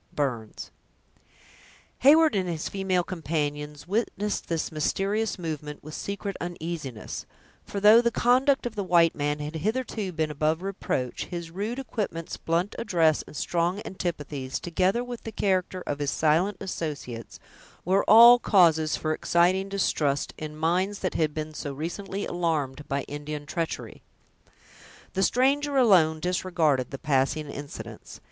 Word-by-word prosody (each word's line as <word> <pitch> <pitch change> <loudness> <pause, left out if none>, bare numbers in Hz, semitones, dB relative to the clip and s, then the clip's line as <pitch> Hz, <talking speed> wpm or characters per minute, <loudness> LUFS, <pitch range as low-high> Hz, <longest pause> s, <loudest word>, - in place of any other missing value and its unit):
—Burns 120 -7 -3 1.3
Heyward 310 +4 +6
and 190 -3 0
his 160 -2 -3
female 190 -2 0
companions 150 -3 -3
witnessed 210 0 -2
this 165 -1 -1
mysterious 195 +8 -1
movement 150 -4 -5
with 155 +1 -9
secret 200 +1 -4
uneasiness; 165 -8 -5 0.4
for, 200 - -5
though 210 +3 +8
the 235 - +2
conduct 255 +4 +3
of 240 - -3
the 205 -2 -3
white 170 -3 +4
man 145 0 -1
had 150 +2 -5
hitherto 215 +1 -2
been 160 -2 -1
above 155 +3 0
reproach, 160 -10 -3
his 170 -2 -6
rude 210 +7 -3
equipments, 210 -10 -4
blunt 170 +5 -1
address, 165 -8 +2
and - - -12
strong 175 +3 0
antipathies, 145 -7 -4
together 185 +7 0
with 245 -1 -7
the 225 - -6
character 185 -3 0
of 145 - -3
his 145 -1 0
silent 165 +8 +2
associates, 145 -10 -5 0.5
were 190 +3 +3
all 235 +3 +10
causes 165 -8 +4
for 155 0 -1
exciting 180 +4 +2
distrust 150 -7 0
in 155 -1 -7
minds 180 +6 +1
that 185 - -2
had 155 -2 +1
been 155 0 -4
so 145 -2 -5
recently 190 +6 -4
alarmed 150 -5 -2
by 140 0 -1
Indian 145 0 -6
treachery. 165 +2 -4 1.1
The 190 - 0
stranger 275 +6 +2
alone 175 -11 +5
disregarded 165 -6 0
the 135 - -6
passing 140 +2 0
incidents. 145 0 -9
170 Hz, 140 wpm, -26 LUFS, 150-200 Hz, 1.3 s, all